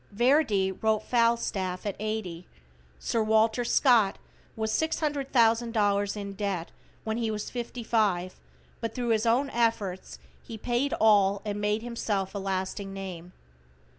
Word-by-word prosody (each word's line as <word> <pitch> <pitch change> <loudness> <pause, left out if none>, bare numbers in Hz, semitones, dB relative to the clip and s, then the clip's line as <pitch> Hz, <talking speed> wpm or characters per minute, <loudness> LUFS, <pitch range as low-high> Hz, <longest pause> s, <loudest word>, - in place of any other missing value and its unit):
Verdi 230 -4 +2
wrote 215 +2 0
"Falstaff" 230 -6 0
at 205 - -2
eighty. 205 -5 -4 0.5
Sir 225 - -1
Walter 220 +2 +2
Scott 235 -5 +3 0.4
was 220 0 -2
$600,000 230 -9 +1
in 200 -1 -5
debt 195 -4 -3 0.3
when 220 0 -2
he 230 -2 -1
was 210 -1 -4
fifty 240 0 -5
five, 195 -6 0 0.4
but 230 -2 -4
thru 245 -2 -2
his 225 0 +2
own 265 +5 +2
efforts 225 -6 -1 0.2
he 230 - -9
paid 245 +5 -1
all 200 -2 +4
and 205 0 -3
made 210 +2 0
himself 210 -5 -2
a 200 - -3
lasting 195 +1 -3
name. 180 -3 -7
215 Hz, 135 wpm, -28 LUFS, 195-235 Hz, 0.5 s, all